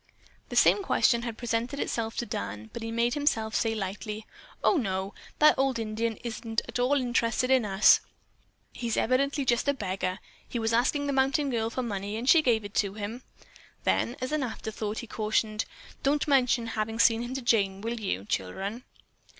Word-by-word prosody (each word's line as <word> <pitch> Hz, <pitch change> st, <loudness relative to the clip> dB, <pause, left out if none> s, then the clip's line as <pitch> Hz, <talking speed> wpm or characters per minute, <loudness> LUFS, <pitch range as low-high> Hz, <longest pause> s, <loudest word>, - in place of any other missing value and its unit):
The -, -, -6 dB
same 410 Hz, -, +5 dB
question 235 Hz, -10 st, +3 dB
had 235 Hz, -2 st, -5 dB
presented 240 Hz, +3 st, -2 dB
itself 225 Hz, -4 st, -2 dB
to 240 Hz, -, -1 dB
Dan, 105 Hz, -, -5 dB
but -, -, -6 dB
he 225 Hz, -, -4 dB
made 235 Hz, +1 st, +1 dB
himself 225 Hz, -7 st, 0 dB
say 225 Hz, -1 st, +1 dB
lightly, 210 Hz, +2 st, -5 dB, 0.4 s
"Oh, -, -, +4 dB
no! 195 Hz, -5 st, -2 dB, 0.2 s
That 305 Hz, -2 st, +5 dB
old 270 Hz, -2 st, +2 dB
Indian 225 Hz, 0 st, -2 dB
isn't 225 Hz, -1 st, -2 dB
at -, -, -4 dB
all 250 Hz, +4 st, +3 dB
interested 245 Hz, 0 st, +1 dB
in 260 Hz, -4 st, +4 dB
us. 195 Hz, 0 st, +6 dB, 0.7 s
He 235 Hz, -1 st, -4 dB
evidently 275 Hz, +4 st, +1 dB
is 260 Hz, -, -1 dB
just 240 Hz, +3 st, +2 dB
a 285 Hz, -, +3 dB
beggar. 185 Hz, -4 st, -2 dB, 0.3 s
He -, -, -3 dB
was 225 Hz, 0 st, 0 dB
asking 265 Hz, +5 st, +2 dB
the 280 Hz, -, -1 dB
mountain 270 Hz, +2 st, +2 dB
girl 225 Hz, -2 st, 0 dB
for 255 Hz, +2 st, -3 dB
money 205 Hz, -2 st, -3 dB
and 240 Hz, +3 st, -4 dB
she 325 Hz, +3 st, +7 dB
gave 230 Hz, -7 st, +2 dB
it 205 Hz, -, -8 dB
to 200 Hz, -1 st, +1 dB
him." 215 Hz, +4 st, -5 dB, 0.6 s
Then, 240 Hz, -, +1 dB
as 255 Hz, -, -3 dB
an 305 Hz, -1 st, 0 dB
afterthought, 220 Hz, -3 st, -4 dB
he -, -, -4 dB
cautioned, 215 Hz, 0 st, -1 dB, 0.4 s
"Don't 290 Hz, +2 st, +1 dB
mention 250 Hz, -4 st, +3 dB
having 220 Hz, +1 st, -2 dB
seen 230 Hz, 0 st, +4 dB
him 240 Hz, +2 st, -5 dB
to 270 Hz, -, -3 dB
Jane, 200 Hz, -5 st, +2 dB
will 230 Hz, +2 st, -3 dB
you, 100 Hz, -, -2 dB
children?" 195 Hz, -, -3 dB
230 Hz, 190 wpm, -28 LUFS, 215-255 Hz, 0.7 s, she